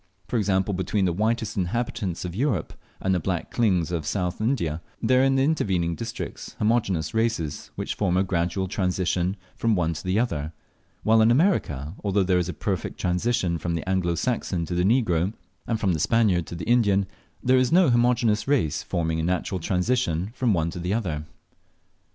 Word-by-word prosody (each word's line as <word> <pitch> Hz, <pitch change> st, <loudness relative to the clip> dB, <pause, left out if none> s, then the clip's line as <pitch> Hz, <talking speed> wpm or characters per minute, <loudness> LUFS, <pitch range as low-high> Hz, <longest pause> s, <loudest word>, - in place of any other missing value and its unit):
For 120 Hz, -, -1 dB
example, 100 Hz, -1 st, +1 dB
between 95 Hz, +2 st, 0 dB
the 90 Hz, -, +1 dB
whitest 110 Hz, +3 st, 0 dB
inhabitants 95 Hz, -1 st, -2 dB
of 90 Hz, -, -5 dB
Europe 115 Hz, -, -1 dB, 0.3 s
and 95 Hz, -, +1 dB
the 90 Hz, -, +2 dB
black 90 Hz, 0 st, -3 dB
Klings 95 Hz, -8 st, +2 dB
of 80 Hz, -4 st, -2 dB
South 90 Hz, 0 st, -2 dB
India, 85 Hz, -, 0 dB, 0.2 s
there 130 Hz, 0 st, +3 dB
are -, -, +4 dB
in 135 Hz, 0 st, +3 dB
the 135 Hz, -, +3 dB
intervening 95 Hz, -, +1 dB
districts 115 Hz, +6 st, -6 dB
homogeneous 100 Hz, -8 st, +1 dB
races 110 Hz, -10 st, -1 dB
which -, -, -3 dB
form 90 Hz, -3 st, 0 dB
a 95 Hz, -, +3 dB
gradual 90 Hz, +1 st, -1 dB
transition 90 Hz, 0 st, 0 dB, 0.2 s
from 115 Hz, -2 st, +1 dB
one 85 Hz, -2 st, +1 dB
to 80 Hz, -, -7 dB
the 95 Hz, +2 st, 0 dB
other; 80 Hz, -10 st, -1 dB, 0.5 s
while 110 Hz, +1 st, +5 dB
in 110 Hz, -, +5 dB
America, 110 Hz, -, +1 dB
although 100 Hz, -1 st, +2 dB
there 90 Hz, -1 st, +2 dB
is 90 Hz, 0 st, -2 dB
a -, -, -3 dB
perfect 90 Hz, +4 st, -3 dB
transition 90 Hz, -2 st, 0 dB
from 85 Hz, +2 st, -2 dB
the 85 Hz, -, -4 dB
Anglo 95 Hz, -2 st, +1 dB
Saxon 90 Hz, -3 st, -1 dB
to 90 Hz, -, -5 dB
the 90 Hz, 0 st, +1 dB
negro, 95 Hz, -4 st, +2 dB, 0.3 s
and 115 Hz, -2 st, 0 dB
from 95 Hz, -4 st, +1 dB
the 80 Hz, -, -1 dB
Spaniard 95 Hz, -2 st, +2 dB
to -, -, -6 dB
the 85 Hz, -, -5 dB
Indian, 105 Hz, -5 st, +3 dB, 0.4 s
there 130 Hz, +1 st, +4 dB
is 130 Hz, -1 st, +1 dB
no 175 Hz, -5 st, +5 dB
homogeneous 120 Hz, -2 st, +2 dB
race 110 Hz, -, +1 dB
forming 80 Hz, -3 st, -1 dB
a -, -, -1 dB
natural 90 Hz, +2 st, -1 dB
transition 90 Hz, 0 st, 0 dB
from 125 Hz, -2 st, +1 dB
one 85 Hz, -3 st, +1 dB
to 90 Hz, -, -6 dB
the 90 Hz, +4 st, -1 dB
other. 80 Hz, -9 st, -2 dB
95 Hz, 190 wpm, -25 LUFS, 85-115 Hz, 0.5 s, while